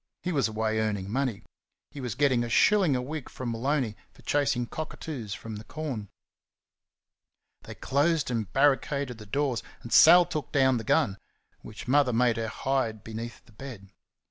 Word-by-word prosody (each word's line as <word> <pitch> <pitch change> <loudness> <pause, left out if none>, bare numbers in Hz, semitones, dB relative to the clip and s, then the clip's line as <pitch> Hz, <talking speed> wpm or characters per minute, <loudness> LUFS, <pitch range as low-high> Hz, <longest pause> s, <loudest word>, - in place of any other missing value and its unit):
He 180 - -1
was 140 -7 +2
away 110 0 -1
earning 105 -3 -2
money. 130 -4 -1 0.5
He 140 - -8
was 120 -4 -4
getting 130 -3 +2
a 120 - -4
shilling 190 - +4
a 125 - 0
week 150 +1 -6
from 125 -2 -5
Maloney, 125 -1 -1 0.2
for - - -20
chasing 135 -4 +1
cockatoos 135 -6 -6
from 110 -2 -7
the 105 - -9
corn. 130 -8 -5 1.6
They - - -9
closed 150 +1 +1
and 110 -4 -2
barricaded 135 -2 +1
the 105 - -11
doors, 135 +1 0 0.2
and 120 - -5
Sal 175 +2 +8
took 155 -6 -5
down 130 -2 +3
the 115 - -4
gun, 100 -2 +1 0.4
which 105 +2 -10
Mother 135 -1 +3
made 120 0 +2
her 115 -1 -2
hide 115 -2 -2
beneath 115 +2 -7
the - - -20
bed. 105 -4 -10
125 Hz, 170 wpm, -28 LUFS, 110-145 Hz, 1.6 s, Sal